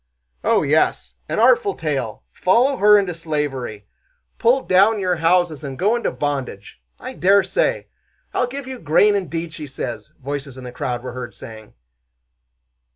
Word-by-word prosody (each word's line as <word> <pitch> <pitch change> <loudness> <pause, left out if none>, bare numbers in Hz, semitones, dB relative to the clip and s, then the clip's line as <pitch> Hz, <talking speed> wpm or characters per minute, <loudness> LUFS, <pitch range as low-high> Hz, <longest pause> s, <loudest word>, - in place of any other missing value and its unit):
"Oh - - +3
yes, 155 +3 +1 0.2
an - - -2
artful 460 -5 +4
tale! 135 -8 -3
Follow 250 +9 +2
her 210 +1 +6
into 195 -3 0
slavery! 145 -10 -4 0.5
Pull 245 +3 +3
down 200 +4 +4
your 180 -2 0
houses 165 -2 +2
and 135 -2 -6
go 205 +6 +2
into 240 - -1
bondage! 135 - -4 0.2
I - - -7
dare 195 +2 +4
say! - - 0 0.5
'I'll 250 - +1
give 275 +2 -6
you 260 -1 -7
grain, 165 +7 +4
indeed!' 170 -4 -3
she 155 -2 -7
says," 130 -2 -6
voices 140 -1 -5
in 130 - -9
the 125 - -7
crowd 120 -1 -4
were 125 -1 -6
heard 125 -1 -7
saying. 110 -2 -11
160 Hz, 155 wpm, -21 LUFS, 135-205 Hz, 0.5 s, her